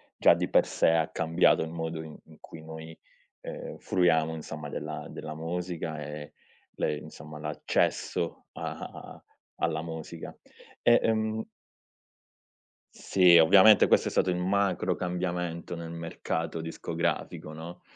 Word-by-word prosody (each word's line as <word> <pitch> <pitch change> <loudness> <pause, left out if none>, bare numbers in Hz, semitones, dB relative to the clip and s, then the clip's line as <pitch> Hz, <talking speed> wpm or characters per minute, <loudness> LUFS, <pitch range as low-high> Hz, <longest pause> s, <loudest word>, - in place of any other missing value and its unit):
già - - +6
di - - -1
per - - +4
sé - - +3
ha 80 -1 +2
cambiato 80 +1 +3
il 80 - -6
modo 80 -1 -4
i 80 -1 -10
in 80 -1 -17
cui 80 - -11
noi, 80 0 -9 0.5
ehm, - - -7
fruiamo 80 -3 +2
insomma 75 -1 -7
della - - -5
della 75 0 -7
musica 85 -1 -4
e 75 0 -7 0.4
le 75 - -1
insomma 75 +1 -10
l'accesso 75 0 -1
a - - -4
a - - -10 0.3
alla 80 -1 -1
musica. 80 -1 -7 0.5
E, 120 0 +6
ehm 110 0 0 1.5
Sì, 90 -2 +5
ovviamente 95 +6 +8
questo - - +3
è - - -4
stato 95 - +2
il 90 - 0
macro 95 -1 +1
cambiamento 90 -1 -3
nel 85 0 -6
mercato 85 0 -3
discografico, 80 -1 -3
no, 85 +3 -9
80 Hz, 135 wpm, -28 LUFS, 80-90 Hz, 1.5 s, ovviamente